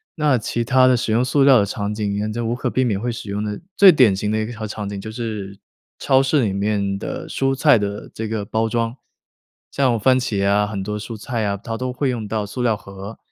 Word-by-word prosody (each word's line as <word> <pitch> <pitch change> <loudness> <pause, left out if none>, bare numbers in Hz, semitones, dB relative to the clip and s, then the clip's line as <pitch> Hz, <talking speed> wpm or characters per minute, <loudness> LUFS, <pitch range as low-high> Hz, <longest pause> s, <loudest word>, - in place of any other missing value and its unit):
那 150 -5 +2
其 120 +1 -2
他 130 +1 +4
的 130 - +5
使 115 -2 -2
用 120 +3 +2
塑 135 +2 +2
料 135 -2 +7
的 100 - +2
场 100 +1 -3
景 105 -2 -2
沿 105 +1 -2
着 120 +2 -3
无 115 - 0
可 120 - -2
避 130 - +1
免 105 -5 -1
会 120 +1 -1
使 115 -3 -7
用 105 +1 -2
的， 105 -1 -4 0.2
最 195 -2 +8
典 125 - +4
型 105 +2 -2
的 110 - 0
一 110 - -1
条 110 -2 -6
场 105 -1 -5
景 100 -1 -5
就 110 +2 -7
是 105 -4 -5 0.4
超 130 0 +3
市 135 0 +2
里 100 -4 0
面 100 -1 -1
的 - - -5
蔬 135 0 0
菜 145 -3 +5
的 100 0 -4
这 110 - -4
个 110 -2 -3
包 110 +2 -1
装， 115 +1 -1 0.8
像 125 -5 +1
番 130 +3 +4
茄 100 -6 -1
啊， 105 +1 +2
很 100 -2 -4
多 105 +1 -4
蔬 110 +2 -7
菜 115 +1 -3
啊， 100 -1 -1
它 115 +3 -6
都 125 +2 -3
会 130 +2 -1
用 115 -3 -4
到 105 0 -2
塑 115 +5 -6
料 115 -3 +1
盒， 100 +2 -10
110 Hz, 270 characters per minute, -21 LUFS, 105-125 Hz, 0.8 s, 最